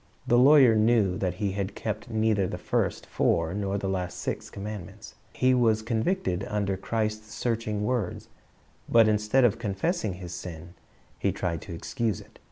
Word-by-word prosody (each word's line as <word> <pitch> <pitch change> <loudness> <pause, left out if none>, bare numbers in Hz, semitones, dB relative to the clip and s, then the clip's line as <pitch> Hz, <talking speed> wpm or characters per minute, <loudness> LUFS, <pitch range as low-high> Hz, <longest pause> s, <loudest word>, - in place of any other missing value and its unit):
The 120 - +4
lawyer 135 -2 +7
knew 110 -4 +3
that 90 -2 -1
he 100 +1 -1
had 100 0 -3
kept 110 +2 -4
neither 110 -3 +1
the - - -5
first - - -1
four 85 0 +1
nor 100 0 -1
the 100 - -3
last 90 -2 -2
six - - -4
commandments. 100 -3 -8 0.2
He 130 0 +2
was 115 -3 +3
convicted 115 - -1
under 100 -2 -1
Christ's 110 +1 -3
searching 110 -3 -1
words, 110 -5 -2 0.6
but 115 -2 +6
instead 105 +5 +2
of 115 0 +2
confessing 110 - -1
his 90 -1 -8
sin, 85 -1 -8 0.5
he - - +1
tried 85 -3 -3
to 85 - -7
excuse 110 +4 -2
it. - - -16
105 Hz, 165 wpm, -27 LUFS, 95-115 Hz, 0.6 s, lawyer